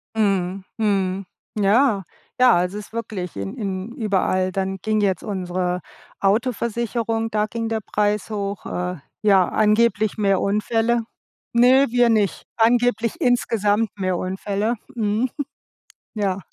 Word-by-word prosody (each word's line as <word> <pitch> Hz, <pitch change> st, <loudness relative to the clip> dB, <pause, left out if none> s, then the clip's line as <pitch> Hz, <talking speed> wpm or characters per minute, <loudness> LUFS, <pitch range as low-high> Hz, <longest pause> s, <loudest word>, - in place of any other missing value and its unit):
Mhm, 195 Hz, -3 st, 0 dB
mhm, 195 Hz, -3 st, 0 dB, 0.3 s
ja, 210 Hz, +1 st, +3 dB, 0.4 s
ja, 250 Hz, -1 st, +6 dB
also 180 Hz, +4 st, 0 dB
ist 210 Hz, -, -10 dB
wirklich 200 Hz, -, -5 dB
in 100 Hz, 0 st, -5 dB
in 195 Hz, +1 st, -4 dB
überall. 185 Hz, -4 st, 0 dB
Dann 190 Hz, 0 st, -2 dB
ging 215 Hz, +3 st, 0 dB
jetzt 190 Hz, -3 st, +1 dB
unsere 180 Hz, -2 st, -2 dB, 0.4 s
Autoversicherung, 225 Hz, +1 st, 0 dB
da 210 Hz, 0 st, +1 dB
ging 225 Hz, +1 st, -3 dB
der 225 Hz, -1 st, -1 dB
Preis 210 Hz, 0 st, 0 dB
hoch, 200 Hz, -1 st, -4 dB
äh, 180 Hz, 0 st, -3 dB, 0.3 s
ja, 195 Hz, -3 st, +5 dB
angeblich 215 Hz, 0 st, +2 dB
mehr 195 Hz, -2 st, +2 dB
Unfälle. 225 Hz, +3 st, +1 dB, 0.5 s
Ne, 255 Hz, +3 st, +5 dB
wir 245 Hz, 0 st, +4 dB
nicht. 215 Hz, -3 st, +1 dB
Angeblich 235 Hz, 0 st, +2 dB
insgesamt 225 Hz, -3 st, +2 dB
mehr 185 Hz, -2 st, 0 dB
Unfälle. 200 Hz, +5 st, -1 dB, 0.2 s
Mhm. 220 Hz, +2 st, 0 dB, 0.9 s
Ja. 195 Hz, -2 st, 0 dB
210 Hz, 125 wpm, -22 LUFS, 190-230 Hz, 0.9 s, ja